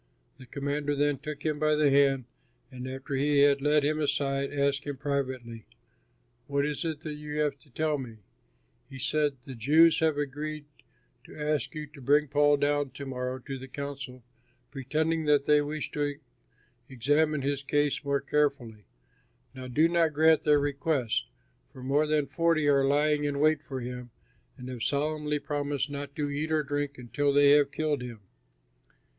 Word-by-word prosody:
The 130 Hz, -, -13 dB
commander 145 Hz, +1 st, -2 dB
then 145 Hz, -1 st, +1 dB
took 150 Hz, 0 st, -7 dB
him 155 Hz, -2 st, 0 dB
by 155 Hz, 0 st, +3 dB
the 150 Hz, -2 st, +3 dB
hand, 135 Hz, -2 st, +3 dB, 0.5 s
and 130 Hz, 0 st, -7 dB
after 135 Hz, +1 st, -6 dB
he 140 Hz, +1 st, +2 dB
had 140 Hz, -1 st, +4 dB
led 150 Hz, +1 st, +3 dB
him 155 Hz, +1 st, 0 dB
aside, 140 Hz, -2 st, 0 dB
asked 140 Hz, -1 st, 0 dB
him 145 Hz, -2 st, -4 dB
privately, 130 Hz, -5 st, -3 dB, 0.8 s
"What 140 Hz, 0 st, 0 dB
is 150 Hz, -1 st, -2 dB
it 160 Hz, -3 st, -3 dB
that 155 Hz, -1 st, -5 dB
you 150 Hz, 0 st, -6 dB
have 145 Hz, -2 st, 0 dB
to 145 Hz, -, -24 dB
tell 155 Hz, +3 st, -1 dB
me?" 115 Hz, -4 st, -8 dB, 0.7 s
He 135 Hz, -, -9 dB
said, 145 Hz, +1 st, 0 dB
"The 135 Hz, -, -7 dB
Jews 155 Hz, +8 st, +4 dB
have 160 Hz, -2 st, +2 dB
agreed 145 Hz, +1 st, -4 dB, 0.6 s
to -, -, -13 dB
ask 150 Hz, -1 st, -1 dB
you 155 Hz, 0 st, -4 dB
to 150 Hz, -1 st, -15 dB
bring 145 Hz, +3 st, +3 dB
Paul 145 Hz, +1 st, +4 dB
down 145 Hz, 0 st, +1 dB
to 135 Hz, +2 st, -8 dB
morrow 125 Hz, -1 st, -3 dB
to 135 Hz, -1 st, -5 dB
the 130 Hz, -, -9 dB
council 135 Hz, -2 st, -7 dB, 0.5 s
pretending 155 Hz, +4 st, -1 dB
that 145 Hz, -2 st, +3 dB
they 150 Hz, 0 st, +5 dB
wish 150 Hz, +1 st, -4 dB
to 145 Hz, -1 st, -1 dB, 0.7 s
examine 145 Hz, +3 st, +1 dB
his 140 Hz, 0 st, -1 dB
case 145 Hz, +1 st, 0 dB
more 140 Hz, 0 st, 0 dB
carefully. 140 Hz, -8 st, -1 dB, 0.7 s
Now 130 Hz, -1 st, -8 dB
do 150 Hz, +6 st, +3 dB
not 170 Hz, -2 st, +2 dB
grant 160 Hz, +1 st, +4 dB
their 150 Hz, -1 st, +5 dB
request, 140 Hz, -, -1 dB, 0.4 s
for 130 Hz, -, -11 dB
more 145 Hz, +4 st, +2 dB
than 150 Hz, -1 st, +1 dB
forty 155 Hz, +2 st, +1 dB
are 140 Hz, -1 st, +4 dB
lying 150 Hz, +1 st, +2 dB
in 145 Hz, -1 st, -1 dB
wait 155 Hz, 0 st, +3 dB
for 135 Hz, -4 st, -6 dB
him 125 Hz, 0 st, -6 dB, 0.5 s
and 125 Hz, -, -9 dB
have 125 Hz, -2 st, -7 dB
solemnly 150 Hz, +2 st, -1 dB
promised 145 Hz, 0 st, -2 dB
not 140 Hz, 0 st, -6 dB
to 150 Hz, -1 st, -1 dB
eat 150 Hz, +2 st, -3 dB
or 155 Hz, -1 st, +2 dB
drink 145 Hz, -1 st, -3 dB
until 140 Hz, +4 st, -1 dB
they 140 Hz, 0 st, +5 dB
have 145 Hz, -1 st, +4 dB
killed 150 Hz, -3 st, -1 dB
him. 120 Hz, -4 st, -8 dB
145 Hz, 175 wpm, -28 LUFS, 135-150 Hz, 0.8 s, they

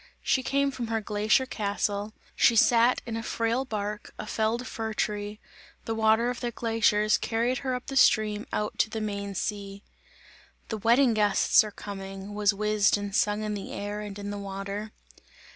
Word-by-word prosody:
She 260 Hz, -, +2 dB
came 280 Hz, +1 st, +1 dB
from 250 Hz, -3 st, -5 dB
her 225 Hz, 0 st, 0 dB
glacier 215 Hz, +4 st, +1 dB
castle, 205 Hz, -2 st, -2 dB, 0.2 s
she 235 Hz, -, +4 dB
sat 235 Hz, +2 st, +4 dB
in 230 Hz, -2 st, -4 dB
a 225 Hz, -, -2 dB
frail 230 Hz, +3 st, -1 dB
bark, 210 Hz, -3 st, -4 dB
a -, -, -6 dB
felled 220 Hz, +3 st, -1 dB
fir 220 Hz, -2 st, -4 dB
tree; 210 Hz, 0 st, -2 dB, 0.5 s
the 225 Hz, -, -2 dB
water 220 Hz, +2 st, +3 dB
of 250 Hz, -, -6 dB
the 240 Hz, -, -2 dB
glaciers 220 Hz, -2 st, +2 dB
carried 235 Hz, +3 st, 0 dB
her 260 Hz, -2 st, -2 dB
up 250 Hz, -, -6 dB
the 270 Hz, -, -6 dB
stream 215 Hz, -5 st, +3 dB
out 210 Hz, -, -2 dB
to -, -, +3 dB
the 220 Hz, -, -4 dB
main 200 Hz, -2 st, -4 dB
sea. 200 Hz, 0 st, -4 dB, 0.9 s
"The 220 Hz, -, -2 dB
wedding 235 Hz, +3 st, +4 dB
guests 210 Hz, 0 st, +4 dB
are 215 Hz, -, -5 dB
coming!" 195 Hz, -1 st, -8 dB
was 205 Hz, 0 st, +3 dB
whizzed 210 Hz, 0 st, +2 dB
and 205 Hz, -1 st, -5 dB
sung 210 Hz, +1 st, +1 dB
in 210 Hz, 0 st, -2 dB
the 200 Hz, -2 st, -6 dB
air 205 Hz, +1 st, -4 dB
and 205 Hz, -1 st, -7 dB
in 205 Hz, 0 st, -5 dB
the 205 Hz, -, -5 dB
water. 200 Hz, +2 st, -5 dB
215 Hz, 180 wpm, -27 LUFS, 205-230 Hz, 0.9 s, she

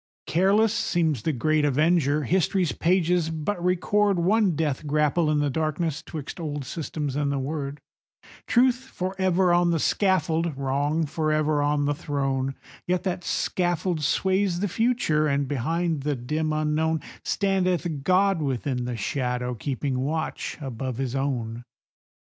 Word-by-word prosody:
Careless 200 Hz, +5 st, +3 dB
seems 160 Hz, -, 0 dB
the 160 Hz, -, 0 dB
great 155 Hz, +3 st, +1 dB
Avenger; 150 Hz, +1 st, +2 dB
history's 180 Hz, +2 st, +1 dB
pages 175 Hz, -1 st, +1 dB
but 165 Hz, +3 st, -3 dB
record 195 Hz, +2 st, +2 dB
One 190 Hz, +1 st, +2 dB
death 150 Hz, -2 st, -1 dB
grapple 150 Hz, +2 st, +2 dB
in 150 Hz, -, +2 dB
the 145 Hz, -1 st, +1 dB
darkness 155 Hz, +1 st, -1 dB
'twixt 155 Hz, +1 st, -7 dB
old 145 Hz, -4 st, -4 dB
systems 150 Hz, -1 st, -4 dB
and 145 Hz, -1 st, 0 dB
the 140 Hz, -, -1 dB
Word; 140 Hz, +1 st, -4 dB, 0.7 s
Truth 250 Hz, 0 st, +4 dB
forever 185 Hz, -4 st, +1 dB
on 175 Hz, 0 st, +3 dB
the 170 Hz, -, +2 dB
scaffold, 165 Hz, -4 st, +1 dB
Wrong 145 Hz, +4 st, 0 dB
forever 155 Hz, 0 st, 0 dB
on 145 Hz, 0 st, +1 dB
the 145 Hz, -, +1 dB
throne,— 135 Hz, -2 st, -2 dB, 0.3 s
Yet 180 Hz, 0 st, 0 dB
that 180 Hz, -1 st, -2 dB
scaffold 175 Hz, -2 st, -1 dB
sways 190 Hz, +3 st, +1 dB
the 205 Hz, -, 0 dB
future, 195 Hz, -8 st, +1 dB
and, 140 Hz, -1 st, 0 dB
behind 160 Hz, +4 st, -1 dB
the 145 Hz, +1 st, -1 dB
dim 155 Hz, +6 st, -2 dB
unknown, 155 Hz, +1 st, 0 dB, 0.2 s
Standeth 185 Hz, -6 st, 0 dB
God 185 Hz, +2 st, +3 dB
within 130 Hz, -2 st, -2 dB
the 120 Hz, -1 st, -3 dB
shadow, 125 Hz, +2 st, -2 dB
keeping 130 Hz, +2 st, -2 dB
watch 155 Hz, +4 st, -3 dB
above 130 Hz, -3 st, -4 dB
his 135 Hz, -1 st, -2 dB
own. 120 Hz, -4 st, -2 dB
155 Hz, 140 wpm, -25 LUFS, 140-175 Hz, 0.7 s, Truth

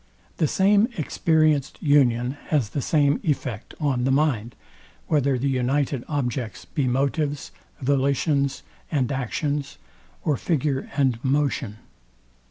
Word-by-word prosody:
The 155 Hz, -, +2 dB
same 200 Hz, +6 st, +4 dB
experienced 155 Hz, -2 st, +1 dB
union 125 Hz, -5 st, +3 dB, 0.2 s
has 140 Hz, -9 st, +1 dB
the 140 Hz, -, -3 dB
same 145 Hz, 0 st, +2 dB
effect 130 Hz, -, -3 dB
on 135 Hz, -5 st, 0 dB
the 130 Hz, -, +1 dB
mind, 130 Hz, -5 st, +1 dB, 0.5 s
whether 140 Hz, -4 st, +2 dB
the 135 Hz, +3 st, -1 dB
united 135 Hz, 0 st, 0 dB
objects 125 Hz, -6 st, -3 dB
be 140 Hz, -3 st, -1 dB
motives, 140 Hz, +3 st, -1 dB, 0.3 s
volitions 140 Hz, +1 st, +1 dB, 0.3 s
and 135 Hz, -5 st, 0 dB
actions; 140 Hz, +2 st, -2 dB, 0.5 s
or 150 Hz, -4 st, +1 dB
figure 145 Hz, -4 st, -1 dB
and 130 Hz, -4 st, +1 dB
motion. 135 Hz, -5 st, 0 dB
140 Hz, 115 wpm, -24 LUFS, 130-150 Hz, 0.5 s, same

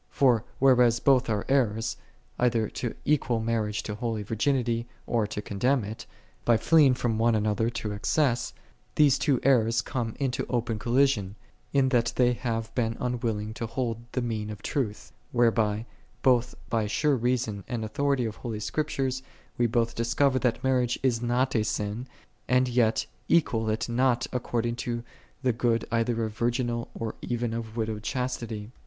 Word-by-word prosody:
For 125 Hz, -5 st, +3 dB
whereas 125 Hz, -3 st, +5 dB
both 130 Hz, -2 st, +3 dB
are 105 Hz, -2 st, 0 dB
errors, 115 Hz, -4 st, +1 dB, 0.4 s
either 115 Hz, -3 st, +2 dB
to 120 Hz, -, -4 dB
equal 130 Hz, -6 st, +2 dB
mar 115 Hz, 0 st, 0 dB
riage 105 Hz, 0 st, -3 dB
to 105 Hz, -, -4 dB
holy 110 Hz, -1 st, -3 dB
virginity, 115 Hz, +1 st, 0 dB, 0.2 s
or 115 Hz, -3 st, 0 dB
to 105 Hz, 0 st, -5 dB
condemn 125 Hz, +5 st, +1 dB
it: 110 Hz, +4 st, -7 dB, 0.4 s
by 120 Hz, -1 st, +4 dB
fleeing 145 Hz, +2 st, +5 dB
from 115 Hz, -3 st, -1 dB
one 115 Hz, 0 st, +3 dB
another 110 Hz, +1 st, +1 dB
to 115 Hz, -2 st, -4 dB
excess, 120 Hz, +4 st, +1 dB, 0.4 s
these 145 Hz, -4 st, +5 dB
two 135 Hz, -4 st, +2 dB
errors 115 Hz, -4 st, +3 dB
come 115 Hz, -4 st, -3 dB
into 135 Hz, -3 st, -1 dB
open 115 Hz, -3 st, -1 dB
collision, 120 Hz, -5 st, +2 dB, 0.4 s
in 135 Hz, -2 st, +3 dB
that 120 Hz, -3 st, +2 dB
they 125 Hz, -1 st, +4 dB
have 115 Hz, -2 st, -3 dB
been 115 Hz, -2 st, -1 dB
unwilling 115 Hz, -4 st, -2 dB
to 115 Hz, +1 st, -4 dB
hold 115 Hz, -1 st, -3 dB
the 125 Hz, -, 0 dB
mean 110 Hz, -3 st, -3 dB
of 105 Hz, -2 st, -8 dB
truth: 110 Hz, -7 st, -3 dB, 0.2 s
whereby, 115 Hz, -3 st, +2 dB, 0.4 s
both 125 Hz, -2 st, +3 dB
by 110 Hz, -2 st, 0 dB
sure 145 Hz, +7 st, +2 dB
reason 120 Hz, -4 st, -1 dB
and 115 Hz, -3 st, -3 dB
authority 140 Hz, +2 st, 0 dB
of 110 Hz, -1 st, -4 dB
holy 115 Hz, -3 st, -5 dB
Scriptures, 135 Hz, +1 st, -1 dB, 0.4 s
we 120 Hz, -, +4 dB
both 115 Hz, 0 st, +1 dB
discover 130 Hz, +3 st, +2 dB
that 125 Hz, +1 st, 0 dB
mar 130 Hz, -1 st, +3 dB
riage 120 Hz, 0 st, -1 dB
is 120 Hz, -3 st, +2 dB
not 125 Hz, +2 st, +1 dB
a 110 Hz, -, +3 dB
sin, 105 Hz, +4 st, -3 dB, 0.4 s
and 125 Hz, 0 st, +3 dB
yet 120 Hz, -2 st, +2 dB, 0.2 s
equal 115 Hz, -9 st, +2 dB
it 110 Hz, +1 st, -1 dB
not 120 Hz, 0 st, +2 dB
to 120 Hz, -1 st, -2 dB, 0.4 s
the 125 Hz, -2 st, +2 dB
good 115 Hz, -1 st, +1 dB
either 115 Hz, 0 st, +1 dB
of 110 Hz, -1 st, -6 dB
virginal 120 Hz, 0 st, -1 dB
or 115 Hz, -1 st, -3 dB
even 120 Hz, -1 st, -2 dB
of 115 Hz, -1 st, -5 dB
widowed 110 Hz, -2 st, -2 dB
chastity. 115 Hz, -3 st, -3 dB
120 Hz, 165 wpm, -27 LUFS, 110-125 Hz, 0.4 s, whereas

